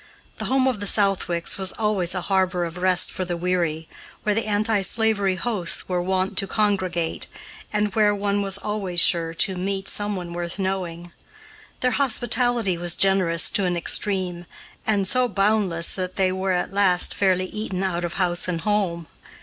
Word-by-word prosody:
The - - -4
home 265 0 +2
of 250 -5 -1
the 205 - -2
Southwicks 195 -4 +2
was 190 -1 0
always 205 -5 0
a 180 - -2
harbor 185 -2 0
of 165 +1 -7
rest 180 0 +3
for 185 - -4
the 175 -1 -4
weary, 170 -3 -1 0.4
where 210 - +1
the 225 +1 -1
anti 210 0 +1
slavery 200 -1 +2
hosts 185 -4 -1
were 180 -1 -1
wont 190 +1 0
to 195 - -1
congregate, 185 -5 -1 0.4
and 210 -1 -1
where 210 -1 +3
one 200 0 -1
was 195 -1 +2
always 200 -4 -2
sure 170 -2 +3
to 190 +3 +2
meet 195 +1 -3
someone 195 -4 -2
worth 175 +1 -5
knowing. 180 -3 -4 0.7
Their 250 - +2
hospitality 240 -7 +1
was 175 0 0
generous 185 -4 +2
to 200 - +1
an 175 -1 -1
extreme, 180 -1 -1 0.4
and 200 -3 +2
so 255 +4 +3
boundless 195 -5 +1
that 185 -1 -4
they 190 -1 +1
were, 190 +1 -2
at 180 +2 -2
last, 190 -3 +3
fairly 185 -2 +1
eaten 195 -1 -4
out 175 -2 -2
of 170 -1 -4
house 175 -2 +1
and 170 -2 -2
home. 190 -4 -1
190 Hz, 175 wpm, -23 LUFS, 175-205 Hz, 0.7 s, rest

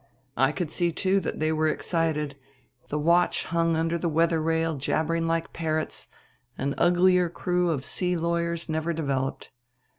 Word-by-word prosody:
I 135 +1 +3
could 170 -1 -3
see, 175 -1 +1
too, 190 +4 +1
that 180 - -4
they 155 0 +1
were 155 0 +1
excited; 155 -3 -1 0.5
the 150 - -1
watch 170 +4 +3
hung 165 -1 +1
under 165 +1 0
the 170 - 0
weather 165 +1 +2
rail 160 0 0
jabbering 165 +4 0
like 165 0 -1
parrots; 155 -1 -2 0.5
an 140 +1 -1
uglier 180 0 +4
crew 180 +1 0
of 140 -4 -2
sea 180 -1 -1
lawyers 170 0 -1
never 160 +1 -1
developed. 135 -4 -2
165 Hz, 155 wpm, -26 LUFS, 155-170 Hz, 0.5 s, uglier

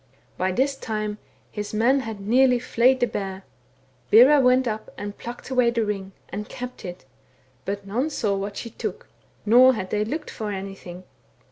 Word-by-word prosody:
By 185 +1 0
this 270 +7 +1
time 215 -4 -4 0.3
his 210 0 -5
men 245 +6 +3
had 225 -5 -6
nearly 250 +4 +4
flayed 255 +1 +2
the - - +5
bear; 195 -4 -5 0.7
Bera 270 +6 +7
went 255 0 +4
up 215 -1 -4
and 205 0 -6
plucked 240 +2 -8
away 250 -2 +4
the 230 -2 0
ring, 195 -2 -4 0.2
and 210 +2 -6
kept 250 0 -7
it, 175 -5 -8 0.6
but 200 0 -4
none 240 +10 -1
saw 210 -9 -1
what 200 +1 -4
she 230 - -6
took, - - -6 0.4
nor 250 +4 +7
had 190 -3 -5
they 210 0 +1
looked 300 +8 -4
for 215 -3 -4
anything. 190 -2 -7
220 Hz, 170 wpm, -24 LUFS, 200-250 Hz, 0.7 s, Bera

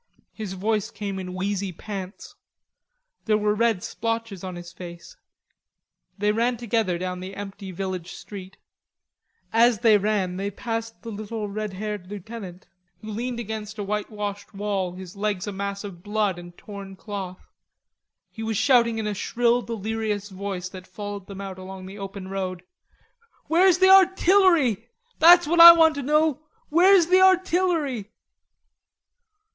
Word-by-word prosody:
His 210 -4 -6
voice 210 +2 -1
came 200 -2 -5
in 180 -1 -6
wheezy 195 0 -2
pants. 190 +2 -8 0.9
There 215 -1 +3
were 210 0 +1
red 225 -3 +1
splotches 225 -4 -3
on 185 -1 -5
his 175 0 -9
face. 170 -1 -10 1.0
They 210 +1 +2
ran 235 +3 0
together 225 -6 0
down 180 0 -4
the 190 +1 -8
empty 200 -1 -7
village 185 -1 -5
street. 195 -2 -10 1.0
As 230 -1 +4
they 220 -4 +5
ran 195 -3 -1
they 200 +1 -2
passed 225 +2 -5
the 230 - -6
little 215 +1 -5
red 210 0 -4
haired 205 -1 -5
lieutenant, 200 -2 -8 0.4
who 215 - -7
leaned 240 +3 -3
against 215 -1 -6
a 205 - -3
whitewashed 205 0 -4
wall, 195 -3 -2
his 185 0 -10
legs 200 -2 -2
a 205 - -4
mass 200 +1 -4
of 190 -4 -9
blood 205 -2 -1
and 175 0 -12
torn 200 -2 -9
cloth. 190 -2 -7 0.9
He 225 - -9
was 220 -1 -2
shouting 235 -1 +3
in 220 - -2
a 210 - -1
shrill 240 +4 +1
delirious 220 -2 -3
voice 190 -1 -5
that 185 -1 -11
followed 205 0 -7
them 200 -1 -8
out 190 -1 -7
along 185 0 -9
the 195 +2 -10
open 195 -1 -7
road. 185 -2 -4 0.8
"Where's 355 +2 +4
the 375 0 +5
artillery? 370 - +5 0.3
That's 345 +2 +8
what 340 +3 +1
I 340 0 +13
want 325 -1 +5
to 285 - -4
know; 300 +1 +2 0.3
where's 360 +3 +6
the 370 +2 +4
artillery?" 350 - +2
210 Hz, 150 wpm, -24 LUFS, 190-235 Hz, 1.0 s, I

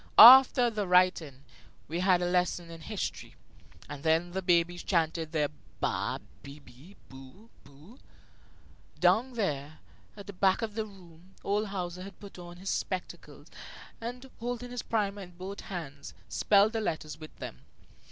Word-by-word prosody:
After 250 0 +10
the 210 -3 -3
writing, 180 -7 +2 0.4
we 165 +3 -3
had 180 -1 +3
a - - 0
lesson 180 -1 0
in 165 -1 -10
history, 205 +4 -5 0.5
and 140 - -8
then 165 +3 +1
the 190 +2 -3
babies 175 -1 +2
chanted 165 -3 -1
their 150 -3 0 0.3
ba, - - -1 0.2
be, 140 +1 -11
bi, 145 +7 -17
bo, 135 - -14
bu. 150 - -17 1.0
Down 250 +3 +3
there 155 - -3 0.4
at 200 - -9
the 200 - -8
back 190 +3 +2
of 220 -2 -3
the 220 0 -3
room 180 -2 -17
old 210 +2 0
Hauser 180 -2 -5
had 195 -1 -10
put 200 -3 -12
on 175 0 -10
his 190 +2 -4
spectacles 185 -2 -5 0.6
and, 245 +3 -6
holding 245 +1 -4
his 245 - -4
primer 205 -2 -2
in 180 -2 -12
both 190 +2 -7
hands, 150 -7 -8
spelled 205 +2 +3
the 225 - -1
letters 155 -6 -4
with 155 -1 -11
them. - - -8
180 Hz, 155 wpm, -29 LUFS, 160-205 Hz, 1.0 s, After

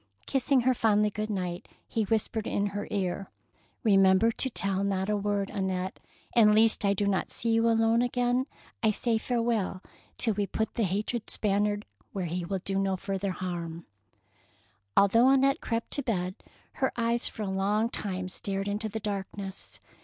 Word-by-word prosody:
Kissing 270 0 +2
her 255 +2 +3
fondly 210 -3 +2
good 215 +1 -3
night, 180 -4 -3 0.2
he 220 -2 -1
whispered 220 +1 -1
in 200 - 0
her 205 - -3
ear, 195 -1 -2 0.2
— - - -37
" - - -42
Remember 195 0 +5
to 265 - 0
tell 195 -4 0
not 195 0 0
a - - +2
word, 205 -1 -1
An 195 -3 -1
nette, 185 0 -3 0.4
and 210 -3 +6
lest 220 0 +4
I 200 0 +3
do 205 - 0
not 195 -2 0
see 230 - -1
you 225 +1 +3
alone 225 +1 +3
again, 245 +1 +1 0.3
I 220 - +4
say 225 +1 0
farewell, 230 -6 -1 0.3
till 225 - +2
we 205 0 -1
put 220 +2 -2
the 225 - +1
hated 210 +5 -2
Spaniard 205 0 0 0.3
where 190 -3 -2
he 175 +2 -2
will 190 +2 -3
do 195 0 0
no 195 -1 0
further 195 +1 -3
harm." 170 -3 -4 1.1
Although 230 +6 +6
Annette 275 +2 +3
crept 230 -1 -2
to 285 - 0
bed, 185 -8 -1 0.5
her 265 - +3
eyes 235 0 +1
for 215 - -4
a - - -3
long 205 +3 +1
time 185 -5 -4
stared 195 +1 -3
into 210 +2 -1
the 220 +2 -4
darkness. 195 -1 -5
205 Hz, 180 wpm, -29 LUFS, 195-230 Hz, 1.1 s, and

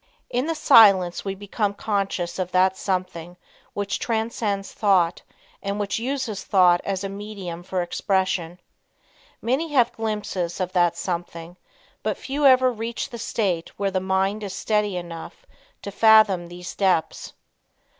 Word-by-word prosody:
In 250 +4 0
the 330 - -1
silence 195 - +5
we 195 -1 -3
become 205 +1 -2
conscious 195 -4 -2
of 185 -1 -2
"that 185 +1 +3
something" 180 -3 -4 0.4
which 200 -1 -2
transcends 220 -3 -2
thought 185 -5 +2 0.4
and 200 +1 -3
which 200 0 -2
uses 245 -4 -3
thought 180 -3 +4
as 195 -1 -3
a - - -2
medium 195 -4 -7
for 180 0 -2
expression. 180 -1 -1 0.8
Many 265 +8 0
have 245 -4 +4
glimpses 210 -6 -3
of 185 -1 -2
"that 175 -2 +2
something," 170 -1 -5 0.5
but - - -2
few 280 +1 +1
ever 255 -1 +5
reach 230 0 -5
the 235 - -7
state 190 -7 -1
where 200 -1 -1
the 185 - 0
mind 190 +2 0
is 195 -2 -5
steady 210 -3 0
enough 175 - -8 0.4
to 200 - -5
fathom 215 -4 +5
these 175 +1 -8
depths. 185 -5 0
195 Hz, 145 wpm, -23 LUFS, 180-215 Hz, 0.8 s, silence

